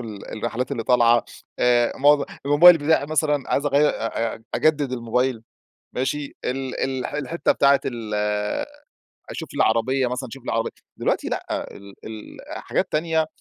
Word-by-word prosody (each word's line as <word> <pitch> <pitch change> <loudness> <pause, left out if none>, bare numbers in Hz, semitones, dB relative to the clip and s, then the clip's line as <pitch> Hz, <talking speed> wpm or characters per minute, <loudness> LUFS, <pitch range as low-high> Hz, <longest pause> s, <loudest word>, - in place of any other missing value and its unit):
فال 110 -4 -8
الرحلات 120 +4 -3
اللي 115 - -2
طالعة، 120 -2 +4 0.3
آآ 120 -1 +3
معظ 145 +1 +5 0.2
الموبايل 165 +4 +8
بتاعي 145 -1 +2
مثلًا 150 -2 +1
عايز 140 - +1
أغير 145 +1 +4
أ 115 0 -2
أ 115 - -15
أجدد 150 -4 +1
الموبايل 125 0 -1 0.5
ماشي؟ 140 +3 -3
ال 130 0 -3
ال 130 -1 -1
الح - - -5
الحتّة 155 +3 0
بتاعة 140 0 +4
ال 115 -4 -4 1.2
أشوف 160 - -6
لي - - +3
عربيّة 125 +4 +1
مثلًا 125 +1 -4
أشوف 130 +2 -11
لي - - -2
عربيّة. 115 0 0 0.3
دلوقتي - - -1
لأ، - - -3
ال 100 0 -13
ال 110 -1 -9 0.3
حاجات - - -2
تانية، 160 0 +1
130 Hz, 155 wpm, -23 LUFS, 115-145 Hz, 1.2 s, الموبايل